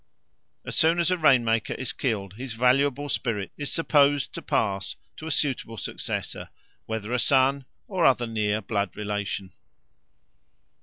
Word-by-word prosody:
As - - -5
soon 165 +2 +4
as 170 +1 +2
a 185 - +2
rain 130 -6 +5
maker 115 0 0
is 130 - -3
killed, 100 -7 -2
his 120 +2 -6
valuable 135 +4 +2
spirit 115 -8 -2
is 145 -1 -4
supposed 145 -4 +3
to - - -6
pass 100 -1 -1 0.2
to 155 - -7
a - - -2
suitable 130 -6 -1
successor, - - -4 0.4
whether 110 +1 -3
a 125 - +2
son 135 0 +3 0.2
or 185 -4 -1
other 125 -4 +4
near 110 -2 0
blood 100 -3 -2
relation. 100 -2 -3
125 Hz, 150 wpm, -26 LUFS, 105-140 Hz, 0.4 s, rain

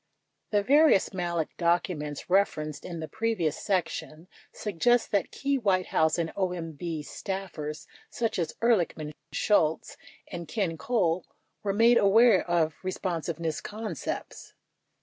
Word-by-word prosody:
The 205 -1 +2
various 285 -5 +5
Malek 170 -3 -2
documents 170 -4 -1
referenced 155 -6 +1
in 170 -2 -6
the 160 - -4
previous 220 -8 -1
section 170 -4 -2 0.2
suggest 225 +4 +1
that 200 -5 +1
key 275 0 -1
White 190 -5 +2
House 160 +1 +2
and 165 -1 -2
OMB 170 -4 -3
staffers 170 -6 -5 0.2
such 225 -4 -2
as 165 -3 -2
Ehrlichman, 170 -9 +1 0.2
Shultz, 160 -7 +1 0.3
and 170 -2 -7
Ken 185 -2 -1
Cole 180 -4 0 0.4
were 200 - -1
made 230 +4 +5
aware 210 +1 +5
of 165 -2 +2
responsiveness 170 -4 -3
concepts. 215 +1 -6
180 Hz, 120 wpm, -28 LUFS, 160-210 Hz, 0.4 s, various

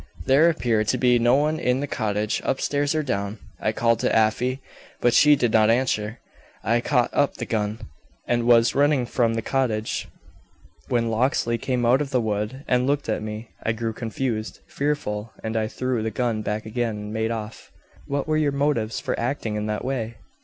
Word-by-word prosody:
"There 145 +6 +5
appeared 115 -9 0
to - - +2
be 125 -1 +4
no 120 +2 +4
one 155 +2 +1
in 125 -4 +1
the 145 - -1
cottage, 105 -5 -1
upstairs 145 +2 0
or 155 - +1
down. 100 -5 -2 0.2
I - - 0
called 115 -1 +1
to - - +1
Afy, 120 +4 +2 0.4
but 120 - +3
she 150 -1 +7
did 120 -5 +1
not 110 -1 +5
answer. 115 -2 +1 0.5
I 115 +2 +2
caught 125 -2 +1
up 145 - +2
the 120 - -5
gun, 105 -1 -1 0.5
and 120 -1 0
was 115 -1 +5
running 140 -2 +3
from 115 -1 +1
the 115 - -2
cottage 115 -5 -1 0.8
when 115 -2 0
Locksley 115 0 +1
came 125 -1 -1
out 125 +4 +4
of 145 - -2
the 130 -2 +1
wood 110 +5 -3
and 125 0 +2
looked 145 -3 0
at 110 - 0
me. 110 +1 -6
I 110 - 0
grew 115 0 -3
confused, 110 0 -3
fearful, 115 -7 -2
and 110 0 -3
I 110 -1 +1
threw 130 0 -2
the 110 - -1
gun 115 -1 -1
back 105 0 -3
again 115 -1 -2
and 105 +1 -6
made 110 0 -1
off." 110 -1 -6 0.4
"What 140 +1 -2
were 155 0 +1
your 150 -2 +2
motives 140 -6 0
for - - -2
acting 120 -3 -2
in 105 0 -2
that 105 +2 -3
way?" 120 -4 -3
115 Hz, 195 wpm, -24 LUFS, 110-130 Hz, 0.8 s, she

